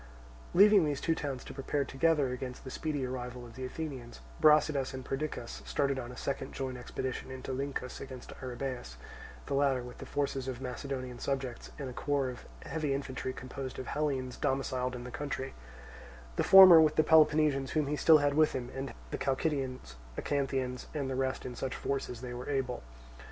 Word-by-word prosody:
Leaving 200 0 +8
these 145 -2 0
two 165 - +1
towns 140 -5 -4
to - - -9
prepare 140 +1 -1
together 140 -1 +2
against 125 0 -6
the 130 - -7
speedy 145 -3 -2
arrival 125 -1 -5
of 115 - -12
the 130 - -6
Athenians, 130 -3 -6 0.2
Brasidas 150 -3 +4
and 130 -1 -7
Perdiccas 135 -4 -4
started 140 -2 0
on 120 -1 -6
a 125 - -10
second 140 - -3
joint 130 -1 -3
expedition 130 +1 -4
into 130 0 -6
Lyncus 135 -1 -4
against 130 -2 -8
Arrhabaeus; 125 - -5 0.5
the - - -3
latter 135 -2 +2
with 125 0 -10
the - - -8
forces 135 -2 -1
of 130 - -2
his 130 - -10
Macedonian 130 -1 -5
subjects, 135 -3 -3
and 140 - -4
a 125 - -6
corps 140 0 0
of 125 - -9 0.2
heavy 150 -4 -1
infantry 135 -1 -3
composed 130 0 -6
of 130 - -5
Hellenes 135 -4 -2
domiciled 130 -1 -1
in 120 - -6
the 125 - -7
country; 135 0 -4 0.8
the - - +1
former 185 -4 +11
with 155 -1 +3
the 155 - +5
Peloponnesians 150 -3 +4
whom 155 -2 +2
he 145 +2 -1
still 155 +2 +7
had 145 -1 +2
with 155 +1 +4
him 125 -1 -4
and 135 0 -5 0.2
the - - -3
Chalcidians, 130 - -1 0.2
Acanthians, 135 -3 -1
and 140 -3 -1
the - - -1
rest 130 0 -1
in 125 - -4
such 130 +1 -3
force 140 0 -2
as 120 -2 -7
they 125 -1 -5
were 125 +3 -6
able. 130 -3 -1
135 Hz, 190 wpm, -32 LUFS, 125-145 Hz, 0.8 s, former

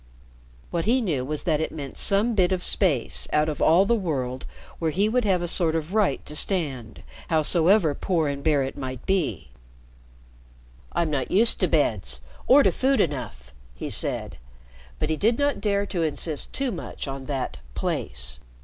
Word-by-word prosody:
What 170 -1 -1
he 240 +5 +3
knew 160 - -1
was 150 +3 -4
that 160 -3 +1
it 160 - -2
meant 140 -4 -7
some 210 +4 +2
bit 185 -3 +2
of 185 -1 -1
space, 60 +1 +1
out 150 0 +2
of 150 -2 -4
all 175 +5 +5
the 235 - +2
world, 135 - -2 0.3
where 165 - 0
he 195 +7 +1
would 245 +1 +1
have 185 -3 +1
a - - -2
sort 165 -2 +2
of 160 +3 -3
right 205 -10 +1
to 150 - -7
stand, 140 - -2 0.3
howsoever 165 +2 +3
poor 165 +1 0
and 140 0 -4
bare 150 -3 +2
it 135 - -5
might 130 -2 -6
be. 190 -6 -1 1.4
"I'm 170 -2 0
not 135 -3 -1
used 225 +4 +5
to 185 - +2
beds 105 - 0 0.3
or 280 +2 +7
to - - +4
food 270 +1 +1
enough," 115 - -3 0.2
he - - -5
said. - - -1 0.6
But 155 0 -2
he 155 - 0
did 225 +6 +2
not 285 -4 0
dare 200 -1 +1
to 185 -3 -3
insist 155 -1 -2
too 270 -2 -1
much 175 -5 -6
on 135 -1 -6
that 135 -3 -3 0.2
"place." 60 0 -3
160 Hz, 180 wpm, -25 LUFS, 140-195 Hz, 1.4 s, or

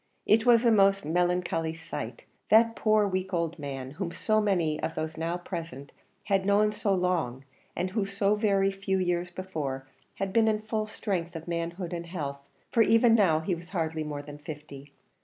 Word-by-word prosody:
It 220 +3 +4
was 235 0 +6
a 235 - +6
most 195 -2 +4
melancholy 170 -1 0
sight 165 - -7 0.2
that 230 +1 +5
poor, 215 -1 +3
weak 185 -1 -2
old 170 0 -2
man, 135 -2 -5
whom 170 +3 -4
so 215 +4 +1
many 170 -7 +1
of 160 0 -3
those 155 0 -3
now 165 +2 -2
present 165 -6 -7 0.3
had 195 -2 +1
known 205 +2 +3
so 210 -1 -1
long, 175 -9 0 0.3
and 185 +1 -2
who 200 -1 -1
so 200 +1 +1
very 200 -2 +2
few 195 0 -1
years 180 -1 0
before 155 -8 -4 0.3
had 195 -1 -3
been 225 0 +4
in 215 -1 +3
the 215 - -13
full 215 -1 -2
strength 180 -5 -3
of 165 +1 -7
manhood 170 +1 -3
and 170 0 -5
health, 145 -6 -4 0.3
for 230 - +4
even 230 +1 +5
now 180 -8 +4
he 180 +3 -1
was 170 +1 -7
hardly 160 -3 -2
more 145 -1 -5
than 145 0 -10
fifty. 145 -2 -9
180 Hz, 190 wpm, -28 LUFS, 160-200 Hz, 0.3 s, was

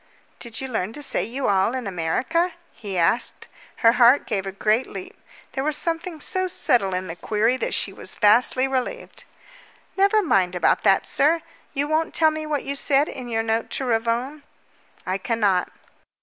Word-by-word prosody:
"Did 230 -2 -5
you 265 - -4
learn 220 -4 -3
to 295 - -7
say - - +1
'you 260 +4 -3
all' 200 +4 +2
in 255 -2 -4
America?" 245 - -1 0.2
he 200 -4 -6
asked. 175 +8 +1 0.4
Her 230 - +8
heart 245 +3 +5
gave 195 -4 -2
a - - -3
great 215 +5 0
leap. 375 +4 -9 0.4
There 265 - -3
was 305 0 0
something 335 0 -2
so 370 +4 -1
subtle 200 - +1
in 185 +1 -3
the 165 -2 -6
query 220 +6 0
that - - -2
she - - -1
was - - -5
vastly 240 +4 +4
relieved. 270 - -4 0.7
"Never 400 +2 +3
mind 185 - +1
about 180 - +2
that, - - +3
sir. 320 +4 +2 0.3
You 285 +1 0
won't 315 +1 -1
tell 315 -1 +4
me 310 0 -5
what 295 -2 -2
you 280 +1 -3
said 280 +1 +2
in 250 - -7
your 225 -1 -1
note 225 0 -1
to 270 - -3
Ravone." 240 +5 -1 0.6
"I 185 +1 -2
cannot." 205 -4 0
250 Hz, 180 wpm, -23 LUFS, 210-300 Hz, 0.7 s, Her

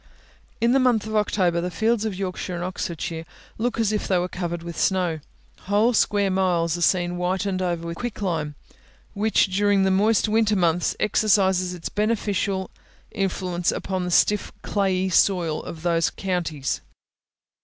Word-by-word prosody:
In 235 +1 +3
the 270 - +4
month 245 -5 +2
of 220 0 -4
October 185 -5 +1
the 180 - -2
fields 225 +3 0
of 215 -3 -2
Yorkshire 185 -1 -4
and 175 - -4
Oxfordshire 170 -2 -4 0.4
look 235 +1 -1
as 220 -2 +2
it 210 - 0
they 185 - +1
were 180 0 0
covered 175 -2 -4
with 170 -1 -7
snow. 180 -4 +1 0.5
Whole 210 +5 +3
square 205 -3 +2
miles 175 -3 +1
are 175 - -5
seen 175 0 +2
whitened 185 +1 -1
over 175 -2 -2
with 170 0 -5
quicklime, 175 -10 -3 0.6
which 205 -2 +1
during 205 -1 +3
the 190 - +2
moist 210 +4 +3
winter 215 0 +2
months, 175 -2 +1
exercises 190 -4 +2
its 170 - -6
beneficial 205 -3 -1 0.4
influence 180 -3 -1
upon 190 -1 -3
the - - -2
stiff, 205 +4 +2
clayey 190 -2 0
soil, 175 -4 +2
of 160 -1 -9
those 165 -2 +2
counties. 170 -8 -2
190 Hz, 155 wpm, -24 LUFS, 175-210 Hz, 0.6 s, the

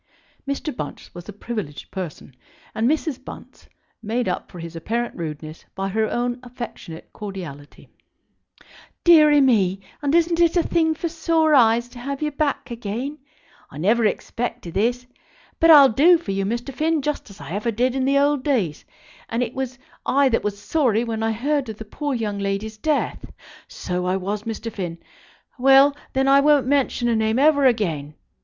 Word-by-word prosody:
Mr. 280 0 -3
Bunce 145 -8 -7
was 175 +3 -10
a - - -6
privileged 205 -8 -6
person, 170 -8 -7 0.4
and 225 +3 +1
Mrs. 310 -3 -1
Bunce - - -12 0.3
made 230 +3 -2
up - - -3
for 180 - -11
his 170 0 -8
apparent 235 +8 -3
rudeness 155 -1 -7
by 195 0 -2
her 220 +2 0
own 245 +1 -2
affectionate 240 -9 -9
cordiality. 175 -9 -9 1.2
"Deary 305 -4 +7
me, 200 -8 +3 0.2
and 290 +1 +1
isn't 335 0 +2
it 340 +1 +3
a 345 - +3
thing 320 -2 +1
for 335 - -3
sore 320 -1 +1
eyes 235 -2 +4
to 245 0 -13
have 275 +2 -4
you 300 -1 -1
back 285 -3 -2
again! 235 +6 -5 0.5
I 140 - -12
never 215 +9 +2
expected 215 -4 -3
this. 245 +4 0 0.5
But 330 - +5
I'll 285 -4 +9
do 320 +10 +5
for 265 -11 -6
you, 195 0 -1
Mr. 240 +5 -3
Finn, 315 +1 0
just 295 -5 -3
as 200 0 -14
I - - -9
ever 210 +5 -2
did 245 +3 0
in 265 0 -1
the 275 +1 +3
old 285 -1 +2
days; 210 - 0 0.5
and 230 +2 0
it 235 0 -5
was 260 -1 -4 0.3
I 275 0 +3
that 230 - 0
was 205 -1 -2
sorry 240 -3 +1
when 225 -2 -3
I 225 0 +1
heard 275 +3 -1
of 215 - -7
the 220 - -8
poor 285 +5 -3
young 210 -4 -3
lady's 200 +2 -3
death; 305 +2 -1 0.4
so 180 0 -4
I 185 +1 +1
was, 200 +3 -4
Mr. 230 0 -5
Finn; 175 -5 -5 0.6
well, 270 +2 +6 0.2
then, 265 0 +1
I 275 +1 +6
won't 290 -2 +4
mention 265 -3 +1
her 235 - +2
name 220 0 +1
never 285 0 +4
again. 160 - -1
240 Hz, 180 wpm, -22 LUFS, 200-280 Hz, 1.2 s, I'll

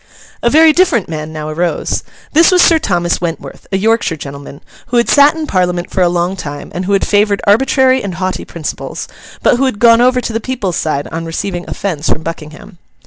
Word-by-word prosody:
A 235 - +2
very 315 +3 +6
different 320 - +2
man 155 -1 -5
now 155 -1 -6
arose. 170 +3 -2 0.3
This 325 +2 +6
was 365 -2 +5
Sir 330 -2 +4
Thomas 175 - -1
Wentworth, 170 -2 -6
a 195 - +1
Yorkshire 220 -3 +1
gentleman, 140 0 -9 0.3
who 245 - 0
had 235 - +2
sat 285 +1 +5
in 320 -1 -4
Parliament 180 -6 -1
for 190 - -1
a 175 - +4
long 175 +2 -1
time, 145 -5 -7
and 180 +1 -4
who 200 - 0
had 195 - +2
favoured 205 -1 +2
arbitrary 260 +4 +3
and 190 -3 -4
haughty 185 0 -3
principles, 160 -3 -6 0.4
but 245 - +4
who 270 - +1
had 260 -6 -1
gone 230 +1 +5
over 250 +1 +3
to 235 - -4
the 225 - -1
people's 230 -8 -3
side 145 -2 -2
on 165 +1 -4
receiving 175 +2 -4
offence 165 -6 -3
from 155 - -1
Buckingham. 165 +4 -8
195 Hz, 205 wpm, -14 LUFS, 165-240 Hz, 0.4 s, very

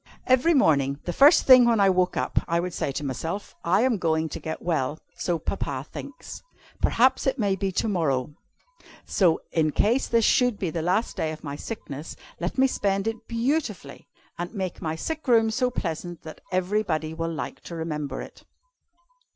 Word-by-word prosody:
"Every 260 +6 +4
morning, 140 - +3
the 175 - -3
first 285 - +6
thing 255 -2 +8
when 230 -2 +3
I 195 -1 +5
woke 185 0 +1
up, - - +1
I 170 0 +1
would 180 0 -3
say - - -2
to 140 - -4
myself: 160 +9 -4
'I 180 +5 +3
am 250 -3 +2
going 160 -2 0
to - - -6
get 160 - -6
well, 155 -4 -1 0.2
so 175 -2 -1
Papa 140 -5 -3
thinks. 280 -2 -9 0.4
Perhaps 260 +3 +3
it 265 +1 +1
may 200 -5 +1
be 195 0 -2
to 225 - 0
morrow. 150 - 0 0.7
So, 175 -5 +2
in 155 -2 +2
case 235 - +2
this 230 -2 +3
should 245 -4 +3
be 180 -5 -2
the 165 - -2
last 185 +8 0
day 155 - -1
of 155 - -9
my 140 -2 -5
sickness, 150 -5 -7 0.2
let 175 +7 -3
me 265 - +5
spend 200 -5 0
it 225 0 -4
_beauti 240 +1 0
_fully, 140 -2 -13 0.3
and 175 0 -4
make 190 -3 -4
my 160 -2 -2
sick 315 - -5
room 225 -2 +4
so 250 +3 +1
pleasant 175 -6 -4
that 155 - -10
everybody 180 -4 0
will 165 +1 -3
like 160 - -5
to 170 - -7
remember 155 -3 -4
it.' - - -14
180 Hz, 190 wpm, -25 LUFS, 160-230 Hz, 0.7 s, thing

